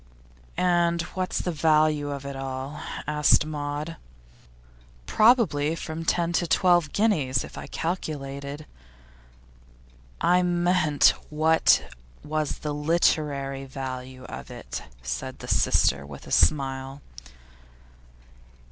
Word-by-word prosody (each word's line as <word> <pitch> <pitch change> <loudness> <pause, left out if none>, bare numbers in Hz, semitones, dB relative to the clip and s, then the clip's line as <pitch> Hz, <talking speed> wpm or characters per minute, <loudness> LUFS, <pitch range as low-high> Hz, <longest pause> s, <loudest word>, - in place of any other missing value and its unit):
'And 170 -1 +2
what's 185 -1 -2
the 180 - -2
value 155 -2 +2
of 140 -1 -5
it 140 0 -5
all?' 135 +2 -5 0.2
asked 150 0 +3
Maud. 150 +1 -4 1.1
'Probably 175 - +3
from 165 0 -6
ten 170 0 +1
to 175 0 +1
twelve 175 -3 +3
guineas, 150 - +1
if - - -11
I - - -7
calculated.' 145 -4 -4 1.5
'I 180 +1 +3
meant, 175 -4 +3 0.2
what 160 +2 +3 0.4
was 155 0 -2
the 150 - -1
literary 145 -3 0
value 130 -1 -7
of 65 - -9
it?' 60 0 -7 0.2
said 60 0 -4
his - - +1
sister, 70 0 +2
with 70 -1 -11
a - - -11
smile. 135 -1 +1
150 Hz, 105 wpm, -25 LUFS, 135-170 Hz, 1.5 s, asked